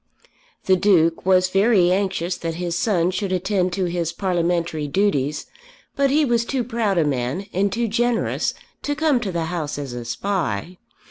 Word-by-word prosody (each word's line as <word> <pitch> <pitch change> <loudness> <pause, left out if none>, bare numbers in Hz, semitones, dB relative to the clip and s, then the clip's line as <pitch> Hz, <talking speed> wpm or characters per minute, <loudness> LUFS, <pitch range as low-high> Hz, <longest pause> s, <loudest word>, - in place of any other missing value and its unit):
The 190 - +5
Duke 175 -3 +2
was 185 -1 +4
very 195 -2 +4
anxious 185 -2 0
that 165 -1 -4
his 175 0 -3
son 180 -2 +1
should 185 +1 -3
attend 185 0 0
to 185 0 0
his 170 -2 -2
parliamentary 170 -4 -1
duties, 150 -4 0 0.5
but 280 -1 +2
he 300 +2 +3
was 235 -3 +2
too 255 +1 -2
proud 225 -5 -1
a 165 - +3
man 135 +6 -2
and 195 +2 +1
too 235 +2 -1
generous 235 +2 0 0.3
to 290 - -2
come 305 -4 +2
to 210 -5 -3
the 170 -2 -2
House 160 -4 -3
as 140 -4 -5
a 120 -1 -5
spy. 175 - -3
185 Hz, 175 wpm, -22 LUFS, 170-205 Hz, 0.5 s, The